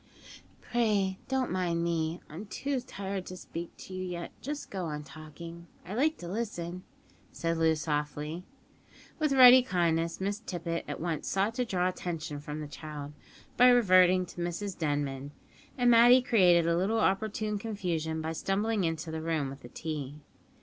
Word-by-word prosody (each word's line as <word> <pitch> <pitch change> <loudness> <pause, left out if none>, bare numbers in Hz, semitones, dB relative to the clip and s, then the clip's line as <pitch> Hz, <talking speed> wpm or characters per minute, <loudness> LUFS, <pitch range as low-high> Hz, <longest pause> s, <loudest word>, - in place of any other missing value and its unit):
"Pray 205 -5 +1
don't 265 -1 0
mind 175 -2 0
me; 165 0 -1
I'm 180 +8 -8
too 275 +5 -2
tired 195 -5 -5
to 185 - -7
speak 170 -1 -6
to 190 - -10
you 185 0 -4
yet; 175 -2 -5
just 295 +2 -5
go 190 -3 -3
on 150 -2 -4
talking. 160 +3 -10 0.2
I 185 - -6
like 305 +7 +1
to 175 - -8
listen," 180 -4 -4 0.5
said 165 -1 -2
Loo 160 -1 +4
softly. 150 +2 -3 0.8
With 305 -2 +1
ready 255 -1 +9
kindness, 170 -7 0
Miss 200 +2 -2
Tippet 170 -5 -4
at - - -5
once 165 -2 -3
sought 195 +3 +1
to 250 +1 -1
draw 180 -5 0
attention 165 -5 -4
from 150 +1 -6
the 150 - -5
child, 150 -1 -8 0.4
by 250 - +8
reverting 185 -6 +5
to 175 - -8
Mrs 175 +3 -3
Denman; 145 -2 -2 0.4
and 245 -1 +4
Matty 240 +2 +7
created 180 -8 +5
a 170 0 +2
little 195 +6 +1
opportune 210 +1 0
confusion 170 -7 -2
by 160 - -2
stumbling 205 +4 0
into 165 -1 -2
the 160 0 -4
room 160 -4 -1
with 135 - -9
the 120 - -11
tea. 150 -3 -5
175 Hz, 165 wpm, -30 LUFS, 160-205 Hz, 0.8 s, ready